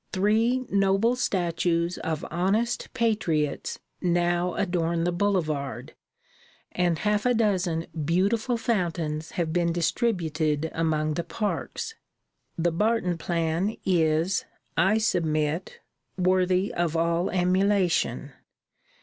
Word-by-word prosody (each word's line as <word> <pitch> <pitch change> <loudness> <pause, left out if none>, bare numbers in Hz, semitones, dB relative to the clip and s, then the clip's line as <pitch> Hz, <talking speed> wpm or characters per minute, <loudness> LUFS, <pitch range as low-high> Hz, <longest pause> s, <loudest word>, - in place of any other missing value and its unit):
Three 225 +6 +2
noble 195 +4 +3
statues 175 -5 0
of 160 -2 -3
honest 195 +8 0
patriots 195 - 0 0.2
now 175 0 +1
adorn 170 -3 0
the 175 - +1
boulevard, 165 -8 -1 0.8
and 175 -2 +1
half 210 +2 0
a 250 -1 +2
dozen 185 -7 +1 0.2
beautiful 205 - +1
fountains 170 -8 -2
have 165 -3 -1
been 170 -1 +2
distributed 160 - 0
among 155 -2 0
the 170 - -2
parks. 215 - -3 0.6
The 170 +1 +1
Barton 185 -1 0
plan 170 +5 -1
is, 165 0 +2 0.3
I 190 +6 +3
submit, 165 -5 -1 0.4
worthy 185 +1 +2
of 170 -2 0
all 170 +2 +1
emulation. 185 0 +1
175 Hz, 100 wpm, -26 LUFS, 165-200 Hz, 0.8 s, noble